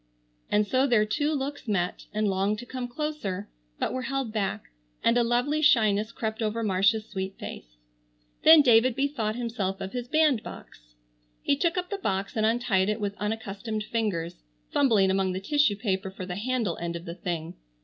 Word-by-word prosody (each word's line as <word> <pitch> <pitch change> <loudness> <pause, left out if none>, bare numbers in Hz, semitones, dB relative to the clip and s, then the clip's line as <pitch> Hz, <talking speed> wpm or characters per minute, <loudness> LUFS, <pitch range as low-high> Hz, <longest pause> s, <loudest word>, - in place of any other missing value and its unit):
And 210 0 +3
so 260 +6 +2
their 225 -5 +4
two 290 +9 0
looks 285 -2 -3
met, 180 -4 -1
and 215 0 0
longed 195 +2 +1
to 245 - -8
come 255 0 -5
closer, 240 -8 -4 0.3
but - - -1
were 255 - -2
held 270 -5 -2
back, 200 - -2 0.3
and 230 - +4
a 245 - +4
lovely 245 +6 +1
shyness 220 -6 +3
crept 220 -1 -4
over 220 +1 -1
Marcia's 205 +2 +2
sweet 190 -1 -5
face. - - -9 0.6
Then 315 -1 +8
David 240 -1 +5
bethought 270 -6 -1
himself 225 -6 -3
of 190 - -6
his 245 -1 -4
bandbox. 245 - -1 0.5
He 280 - +3
took 340 +5 0
up 360 +1 -3
the 400 - -2
box 195 - -2
and 220 -1 +2
untied 225 -4 +1
it 215 +1 -1
with 205 -1 -2
unaccustomed 215 +1 -3
fingers, 205 - -2 0.3
fumbling 215 -9 +3
among 190 -1 +1
the 185 - -2
tissue 290 +2 +2
paper 195 -2 -2
for 190 -1 -7
the 180 -1 -5
handle 230 -3 -1
end 170 0 -3
of 170 +1 -7
the 170 - -5
thing. 170 -2 -4
215 Hz, 180 wpm, -27 LUFS, 195-250 Hz, 0.6 s, Then